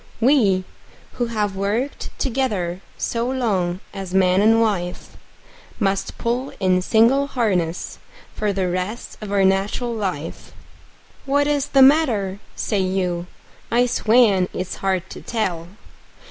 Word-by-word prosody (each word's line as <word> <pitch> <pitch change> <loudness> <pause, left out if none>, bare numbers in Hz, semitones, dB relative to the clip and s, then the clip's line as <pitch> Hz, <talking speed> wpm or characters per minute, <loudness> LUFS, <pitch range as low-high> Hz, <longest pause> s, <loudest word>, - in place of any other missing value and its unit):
We, 225 -7 +3 0.5
who 240 -1 -2
have 210 -4 -1
worked 210 +8 -2
together 210 -9 -1 0.2
so 235 +1 -1
long 195 -9 -1
as 190 -1 -5
man 185 0 +4
and 225 +2 +5
wife, 190 -6 -2 0.6
Must 195 -2 -1
pull 245 +3 -2
in 185 -1 +2
single 235 +8 +3
harness 185 -10 -1 0.3
for 210 -1 -1
the 190 -2 -1
rest 185 +6 -4
of 210 -2 -6
our 200 -1 +3
nat'ral 195 +5 0
life. 185 -8 -4 0.7
"What 285 +1 +2
is 290 -1 0
the 270 -1 +5
matter?" 235 -10 +3 0.2
say 210 - -1
you. 185 -2 -1 0.4
I 240 +2 +3
swan 220 -6 +3
it's 185 0 -4
hard 190 -1 -1
to - - -8
tell! 175 -8 -2
205 Hz, 130 wpm, -21 LUFS, 185-240 Hz, 0.7 s, and